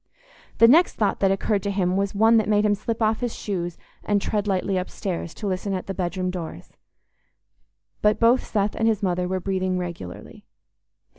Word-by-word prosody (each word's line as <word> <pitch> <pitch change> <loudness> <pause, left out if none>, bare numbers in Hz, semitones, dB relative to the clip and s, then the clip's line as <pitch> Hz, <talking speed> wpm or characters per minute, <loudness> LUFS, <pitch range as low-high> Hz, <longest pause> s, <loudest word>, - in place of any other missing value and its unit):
The 230 - +7
next 325 +9 +5
thought 205 -3 0
that 195 - +3
occurred 195 +1 0
to 200 - -3
him 185 -2 0
was 200 +1 -1
one 225 +3 +5
that 215 -1 +1
made 210 0 +3
him 210 - +3
slip 220 +2 -2
off 220 0 +2
his 245 -2 -3
shoes 175 -4 -4 0.3
and 205 -1 +1
tread 205 +1 -2
lightly 195 0 0
upstairs, 180 -2 -3
to 215 - -7
listen 195 +1 -2
at 185 - -4
the 195 - -4
bedroom 185 0 -2
doors. 175 -3 -7 1.3
But 210 0 +3
both 240 +2 +4
Seth 205 -1 -1
and 225 - +1
his 215 -2 +1
mother 180 -1 0
were 185 +1 -1
breathing 185 0 -1
regularly. 170 - -7
195 Hz, 190 wpm, -24 LUFS, 185-215 Hz, 1.3 s, The